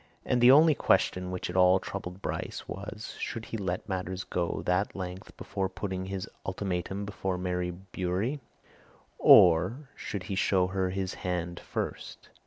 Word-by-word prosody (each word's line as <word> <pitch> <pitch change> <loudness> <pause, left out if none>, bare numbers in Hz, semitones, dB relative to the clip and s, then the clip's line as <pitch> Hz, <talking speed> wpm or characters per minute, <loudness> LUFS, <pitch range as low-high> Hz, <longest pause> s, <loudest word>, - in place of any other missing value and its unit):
And 125 - +1
the 120 - +8
only 155 +4 +8
question 90 -8 +2
which 90 0 -3
at 90 - -6
all 90 0 +6
troubled 95 0 -7
Bryce - - -4
was 105 +2 -7
should 115 -1 -4
he - - -6
let 95 -3 -3
matters 95 -1 -3
go 85 -2 -1
to - - -5
that 90 +3 0
length 95 +1 -7
before 95 -2 -3
putting 95 -1 -4
his 95 -1 -4 0.2
ultimatum 95 +1 -3
before 95 -2 -3
Mary 90 -1 -1
Bewery, 95 +7 -3 0.8
or 95 - +6
should 100 -3 -5
he 100 - -5
show 95 -1 +3
her 95 0 -1
his 95 0 -2
hand 90 -1 -3
first? - - -5
95 Hz, 160 wpm, -29 LUFS, 90-100 Hz, 0.8 s, the